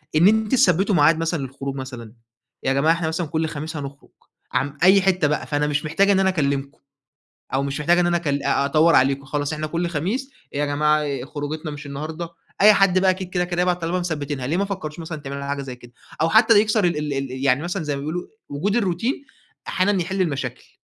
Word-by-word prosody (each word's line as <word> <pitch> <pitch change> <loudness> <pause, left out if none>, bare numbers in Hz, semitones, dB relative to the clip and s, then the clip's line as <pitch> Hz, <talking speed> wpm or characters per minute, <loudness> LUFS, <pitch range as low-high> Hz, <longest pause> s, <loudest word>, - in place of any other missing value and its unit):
إن 165 +4 +6
أنتِ 220 0 +2
تثبّتوا 200 -6 +3
معاد 155 +1 +5
مثلًا 165 0 -1
للخروج 135 +1 -5
مثلًا؟ 125 -5 -8 0.5
يا 135 - +1
جماعة 145 +4 +3
إحنا 170 -1 -2
مثلًا 160 +1 -2
كل 160 +1 -1
خميس 155 +1 -5
هنخرُج، 140 -1 -8 0.4
عم 145 +3 -1
أي 190 +2 +7
حتّة 185 -5 +2
بقى، 150 - -2
فأنا 150 0 0
مش 150 +1 -1
محتاجة 195 +6 +3
إن 195 - +3
أنا 190 0 +3
أكلّمكم 140 -5 -1 0.7
أو 135 +1 +1
مش 140 0 -3
محتاجة 170 +4 +3
إن 175 - +3
أنا 175 0 +2
أكل 145 -4 -2
أ 140 - +1
أدوَّر 155 +4 +4
عليكم 135 +1 +2
خلاص 145 +2 -2
إحنا 155 0 -3
كل 170 +3 -2
خميس 190 - -2 0.2
يا 145 +1 0
جماعة 150 +1 +2
ي 140 -4 -3
خروجتنا 150 +2 -5
مش 145 0 -8
النهارده؟ 155 +4 -5 0.3
أي 210 +1 +8
حد 195 -2 +4
بقى 190 0 +3
أكيد 185 -1 -2
كده، 180 -1 0
كده 175 0 -1
هيبعت 180 -1 0
طالما 170 +2 -1
مثبّتينها، 145 -6 -3
ليه 160 +5 0
ما 200 - +1
فكّرتوش 180 -6 -6
مثلًا 165 -1 -6
تعملوا 140 0 -6
ل - - -5
حاجة 140 0 -3
زي 130 -2 -7
كده؟ 120 -1 -16 0.3
أو 165 - +3
حتّى 220 +2 +6
يكسّر 215 0 +2
ال 170 -3 +1
ال 150 -1 -2
ال 135 -1 -3
يعني 135 +2 +2
مثلًا 175 +1 -3
زي 150 -1 -2
ما - - -5
بيقولوا 160 +5 -4 0.2
وجود 175 +9 -1
الروتين، 230 - -1 0.4
أحيانًا 190 0 +1
يحِل 190 +3 -2
المشاكل. 135 -7 -4
155 Hz, 220 wpm, -22 LUFS, 140-180 Hz, 0.7 s, أي